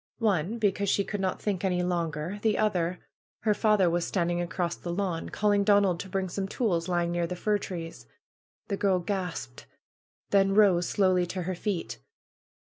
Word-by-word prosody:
One, 205 -2 0
because 205 -2 +1
she 200 - +2
could 205 0 -4
not 185 -1 -1
think 200 -3 -2
any 180 -2 +1
longer. 170 +1 -2
The 215 -1 +2
other, 180 -4 0 0.4
her 215 - +3
father 210 -3 +3
was 170 0 +1
standing 175 -1 0
across 175 0 -2
the 175 - -6
lawn, 175 -2 -2
calling 205 -1 +2
Donald 200 -4 +3
to 190 - -6
bring 190 0 -1
some 190 +2 -3
tools 190 -7 0
lying 175 -1 0
near 175 -1 0
the 180 - -4
fir 210 +3 0
trees. 170 -4 -7 0.6
The 200 - -2
girl 195 -2 +2
gasped, 180 -8 -4 0.6
then 195 -1 +4
rose 190 -5 +4
slowly 185 -3 +2
to 185 +1 -4
her 185 +2 -2
feet. 180 - -3
185 Hz, 175 wpm, -28 LUFS, 175-200 Hz, 0.6 s, then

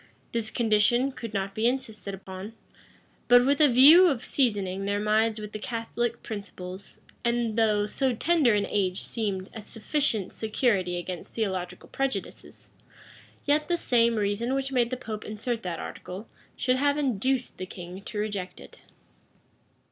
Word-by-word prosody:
This 230 -2 -1
condition 235 +4 +2
could 230 -4 -7
not 195 -1 -2
be 220 +3 +1
insisted 215 -7 -3
on, 190 +3 -7 0.7
but 245 0 +7
with 280 +3 +2
a 300 - +8
view 295 +9 +8
of 270 -8 0
seasoning 200 -7 0
their 205 0 0
minds 215 +1 +2
with 210 -1 -7
Catholic 235 +1 -3
principles; 200 -3 -8 0.3
and 235 -2 0
though 215 -2 +3
so 255 +3 0
tender 295 -5 +3
an 205 -1 +1
age 190 -2 0
seemed 200 -4 -3
a 220 - -7
sufficient 225 -1 -1
security 210 -5 0
against 175 0 -6
theological 190 -5 -3
prejudices, 270 0 -4 0.7
yet 295 +1 +2
the 345 - +1
same 235 -6 +3
reason 215 +5 0
which 270 0 -2
made 245 -3 +2
the 255 - -3
pope 220 -3 -6
insert 225 +2 -3
that 175 -3 -4
article, 190 +7 -7 0.3
should 255 0 +1
have 285 +2 +2
induced 260 -1 -1
the 185 - -4
king 180 +1 -9
to 210 - -7
reject 200 -4 -3
it. - - -14
220 Hz, 150 wpm, -27 LUFS, 200-250 Hz, 0.7 s, a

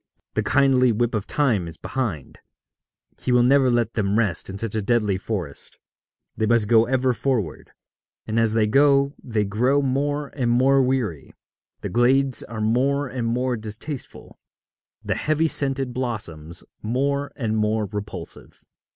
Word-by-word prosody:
The - - 0
kindly 130 -3 +3
whip 120 +2 0
of 110 -2 -2
Time 115 - +1
is 80 0 -8
behind: 100 - -4 0.8
he 130 - -1
will 125 -1 +5
never 135 +1 +4
let 120 -2 +1
them 105 -1 0
rest 100 -7 +1
in 95 - -5
such 110 0 -3
a 110 - -1
deadly 105 -2 +1
forest; 95 -7 -5 0.6
they 110 - 0
must 115 -2 +3
go 115 0 +4
ever 130 0 +1
forward; 115 - -2 0.6
and 110 +1 -1
as 115 -1 +3
they 110 -1 +3
go 140 +4 +3
they 110 -4 -1
grow 120 +8 +1
more 145 +2 -1
and 125 -4 -2
more 135 +3 +4
weary, 125 - -2 0.5
the - - -4
glades 130 +2 +2
are 110 -2 -7
more 135 +6 +1
and 125 -2 -3
more 125 +2 0
distasteful, 110 +6 -8 0.6
the - - -1
heavy 155 +1 +1
scented 135 -4 +1
blossoms 90 -10 -4 0.2
more 140 +5 -1
and 110 -4 -2
more 105 0 +1
repulsive. 105 +1 -7
120 Hz, 150 wpm, -23 LUFS, 105-135 Hz, 0.8 s, will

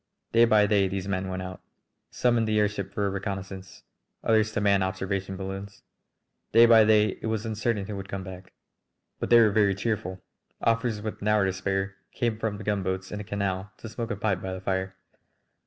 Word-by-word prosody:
Day 115 +1 +6
by 110 -2 +5
day 100 -2 +3
these 95 0 -4
men 95 -1 -1
went 95 0 -4
out, 90 0 -8 0.5
some 120 -1 +1
in 115 -1 +2
the 110 0 +1
airship 105 -2 0
for 105 - -1
a - - +1
reconnoissance, 95 -1 -6 0.4
others 110 -1 +3
to 110 - -1
man 100 -1 +3
observation 95 0 -2
balloons. 95 +1 -7 0.7
Day 115 +1 +8
by 115 -1 +7
day 105 -2 +3
it - - -3
was 110 0 -2
uncertain 110 -1 -1
who 105 0 -5
would 95 0 -7
come 95 -1 -4
back. 95 0 -10 0.7
But - - -3
they 120 - +8
were 110 -2 +5
very 100 -2 +3
cheerful. 100 -3 -2 0.4
Officers 115 -2 0
with 110 - -5
an 105 - -3
hour 105 -2 +4
to 95 - 0
spare 95 +1 -2 0.2
came 120 -2 0
up 110 - -13
from 110 -2 -2
the 105 - -8
gunboats 95 -2 -2
in 105 - -4
the - - -5
canal 100 -1 -2
to - - -9
smoke 115 +1 -5
a 105 - -1
pipe 100 -3 -1
by 95 0 -4
the 95 - -6
fire. 95 0 -2
100 Hz, 210 wpm, -27 LUFS, 95-110 Hz, 0.7 s, Day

